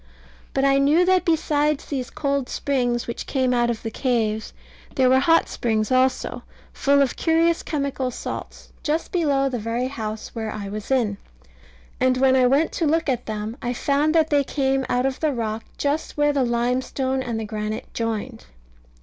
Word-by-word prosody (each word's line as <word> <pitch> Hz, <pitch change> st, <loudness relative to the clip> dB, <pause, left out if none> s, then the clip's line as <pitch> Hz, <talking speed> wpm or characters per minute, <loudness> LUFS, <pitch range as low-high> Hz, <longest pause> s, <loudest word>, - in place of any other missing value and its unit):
But 270 Hz, 0 st, +2 dB
I 275 Hz, 0 st, +4 dB
knew 300 Hz, +6 st, +4 dB
that 370 Hz, -1 st, +3 dB
besides 300 Hz, -3 st, +1 dB
these 260 Hz, -4 st, -4 dB
cold 280 Hz, -3 st, -1 dB
springs 245 Hz, -4 st, 0 dB
which 235 Hz, -, -6 dB
came 260 Hz, -2 st, +1 dB
out 240 Hz, -1 st, +2 dB
of 235 Hz, -2 st, -3 dB
the 225 Hz, -, -3 dB
caves, 220 Hz, -4 st, -1 dB, 0.4 s
there 255 Hz, -1 st, +4 dB
were 260 Hz, -, +6 dB
hot 330 Hz, +4 st, +4 dB
springs 220 Hz, -1 st, -1 dB
also, 255 Hz, 0 st, +1 dB, 0.3 s
full 280 Hz, 0 st, +3 dB
of 265 Hz, -, -2 dB
curious 330 Hz, 0 st, +2 dB
chemical 280 Hz, -3 st, -2 dB
salts, 250 Hz, -, -7 dB
just 315 Hz, +2 st, -1 dB
below 285 Hz, -6 st, +2 dB
the 250 Hz, -3 st, -2 dB
very 230 Hz, +4 st, -2 dB
house 220 Hz, -5 st, -5 dB
where 220 Hz, -2 st, -4 dB
I 205 Hz, -2 st, -5 dB
was 210 Hz, +1 st, -6 dB
in. 235 Hz, -7 st, +1 dB, 0.8 s
And 255 Hz, 0 st, +3 dB
when 260 Hz, 0 st, +4 dB
I 255 Hz, -1 st, +5 dB
went 280 Hz, +5 st, +2 dB
to 330 Hz, -, 0 dB
look 325 Hz, 0 st, +1 dB
at 245 Hz, -2 st, -1 dB
them, 215 Hz, +1 st, -4 dB
I 245 Hz, 0 st, -2 dB
found 290 Hz, +5 st, +1 dB
that 315 Hz, -1 st, +3 dB
they 285 Hz, -1 st, +4 dB
came 270 Hz, -1 st, 0 dB
out 250 Hz, +1 st, +1 dB
of 270 Hz, -1 st, -1 dB
the 310 Hz, -2 st, +1 dB
rock 225 Hz, -2 st, -3 dB
just 290 Hz, +2 st, -2 dB
where 295 Hz, 0 st, +3 dB
the 275 Hz, -2 st, +2 dB
limestone 255 Hz, +2 st, 0 dB
and 235 Hz, -3 st, -3 dB
the 220 Hz, -, -3 dB
granite 215 Hz, 0 st, -4 dB
joined. 225 Hz, -, -3 dB
260 Hz, 185 wpm, -23 LUFS, 235-285 Hz, 0.8 s, were